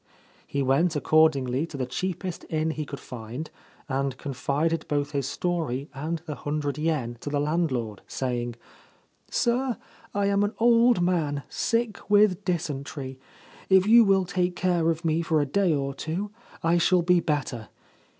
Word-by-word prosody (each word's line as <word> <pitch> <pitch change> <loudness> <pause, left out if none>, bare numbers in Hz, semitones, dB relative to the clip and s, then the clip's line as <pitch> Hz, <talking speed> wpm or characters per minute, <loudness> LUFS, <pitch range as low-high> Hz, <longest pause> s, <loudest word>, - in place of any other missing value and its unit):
He 140 -1 -1
went, 150 +6 +2
accordingly, 150 -2 +3
to 150 - -8
the 130 - -1
cheapest 185 +7 -4
inn 160 0 0
he 155 -1 -4
could 140 - -6
find, 125 +6 -7 0.4
and 135 -1 -1
confided 145 +5 -1
both 145 -1 -1
his 140 -3 -1
story 160 -6 -2
and 155 +3 -4
the 155 - -4
hundred 145 +1 -3
yen 150 -7 -1
to 145 - -5
the 145 0 0
land 155 +2 +1
lord, 115 -5 -3
saying: 120 -2 -2 0.4
' - - -40
Sir, 245 -1 +1 0.3
I 205 0 0
am 200 0 +2
an 205 +2 -1
old 235 -3 +5
man, 155 -6 0
sick 230 -3 -1
with 205 -2 +4
dysentery. 145 -6 -3 0.5
If 190 -1 +6
you 230 +2 +8
will 195 -2 +3
take 180 0 -1
care 175 -3 +1
of 165 +1 -2
me 160 +1 +2
for 160 -2 +1
a 145 - +2
day 185 +6 +2
or 140 -2 -1
two 170 +9 -4 0.3
I 170 +1 +3
shall 180 +1 +3
be 180 +1 +4
better. 140 -8 -2
160 Hz, 165 wpm, -26 LUFS, 140-180 Hz, 0.5 s, you